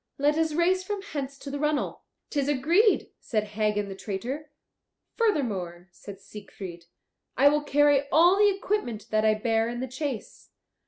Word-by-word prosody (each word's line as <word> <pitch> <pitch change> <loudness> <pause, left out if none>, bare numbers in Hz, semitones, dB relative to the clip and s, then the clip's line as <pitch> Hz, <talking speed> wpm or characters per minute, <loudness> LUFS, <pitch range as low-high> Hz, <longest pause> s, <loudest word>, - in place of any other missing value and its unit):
"Let 290 +2 +2
us 320 -1 +1
race 365 +3 +2
from 400 +1 -4
hence 280 -7 -5
to 280 - -8
the 285 - -4
runnel." 300 0 -1 0.3
"'Tis 285 -2 0
agreed," 335 - +3
said 215 -3 -1
Hagen 210 -1 -1
the 195 - -6
traitor. 235 +10 -5 0.7
"Furthermore," 200 - -1
said 195 +2 -11
Siegfried, 195 -4 -10 0.5
"I 275 +3 +6
will 300 +1 +1
carry 290 -1 +3
all 345 +5 +6
the 415 0 +6
equipment 375 - -2
that 215 0 +2
I 215 0 +4
bare 225 +1 0
in 240 0 -5
the 260 - -3
chase." 260 -2 -6
275 Hz, 160 wpm, -27 LUFS, 215-305 Hz, 0.7 s, I